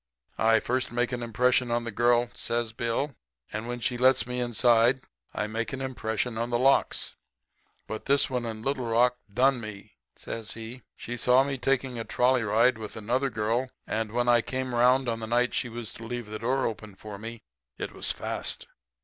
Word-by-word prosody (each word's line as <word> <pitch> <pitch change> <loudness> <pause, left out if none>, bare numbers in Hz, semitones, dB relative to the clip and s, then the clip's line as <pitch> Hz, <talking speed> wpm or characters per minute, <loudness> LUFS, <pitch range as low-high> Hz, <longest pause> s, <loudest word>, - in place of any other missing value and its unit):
I 115 0 +5
first 125 +1 -1
make 120 +1 0
an 125 -1 -3
impression 125 +1 +2
on 120 0 0
the 115 - -4
girl,' 120 +1 +3
says 115 -1 -2
Bill, 120 +5 -1 0.4
'and 110 +2 -3
when 120 0 -3
she 120 +1 -1
lets 130 +1 +5
me 125 0 -3
inside 120 +1 +3 0.3
I 105 - -2
make 115 +4 -3
an 135 - -3
impression 115 -3 -2
on 120 +1 -1
the 120 - +1
locks. 135 +3 +2 0.7
But 110 - -6
this 140 0 +4
one 125 -3 -2
in 110 -1 -5
Little 135 -2 -1
Rock 120 +2 +3
done 125 +3 +3
me,' 105 -1 -9 0.2
says 115 -1 -5
he. 115 +3 -8
'She 120 +1 -6
saw 125 +2 +5
me 135 -1 -3
taking 130 -2 0
a - - -2
trolley 125 +2 +2
ride 110 +3 +3
with 110 -1 -7
another 125 +6 0
girl, 115 +3 0 0.2
and 110 -1 -2
when 120 +1 0
I 120 -1 +5
came 130 +1 -3
'round 125 +2 +4
on 115 -1 -1
the 110 - -5
night 120 +2 +2
she 120 - -1
was 115 -1 -6
to 115 - -10
leave 120 -3 -5
the 110 - -4
door 130 +3 +1
open 110 -3 -5
for 105 0 -9
me 115 +1 -8 0.3
it - - -4
was - - +1
fast. - - -3
120 Hz, 200 wpm, -28 LUFS, 115-125 Hz, 0.7 s, I